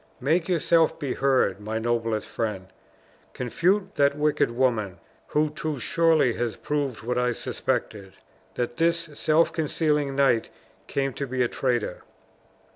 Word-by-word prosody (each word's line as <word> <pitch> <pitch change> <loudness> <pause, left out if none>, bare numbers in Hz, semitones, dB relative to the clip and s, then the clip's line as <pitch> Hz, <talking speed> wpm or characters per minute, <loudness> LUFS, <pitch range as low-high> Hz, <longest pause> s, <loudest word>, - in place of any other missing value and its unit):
Make 160 +7 +1
yourself 165 -2 +3
be 140 -3 -2
heard, 130 -8 +2
my 110 +2 -4
noblest 115 -1 -1
friend! 105 -5 -4 0.6
Confute 185 - 0
that 140 0 +3
wicked 150 -3 +2
woman, 115 -6 0 0.3
who 150 0 +1
too 155 -1 -4
surely 160 -3 +3
has 115 -3 -2
proved 140 -7 -3
what 125 +1 -1
I 125 0 +1
suspected 100 -4 -3 0.4
that 120 0 -3
this 170 +1 +3 0.2
self 155 +3 +2
concealing 150 -3 0
knight 135 -5 +2 0.4
came 135 -1 -1
to 140 - -4
be 130 0 0
a - - +2
traitor." 120 -7 -1
135 Hz, 135 wpm, -25 LUFS, 115-155 Hz, 0.6 s, yourself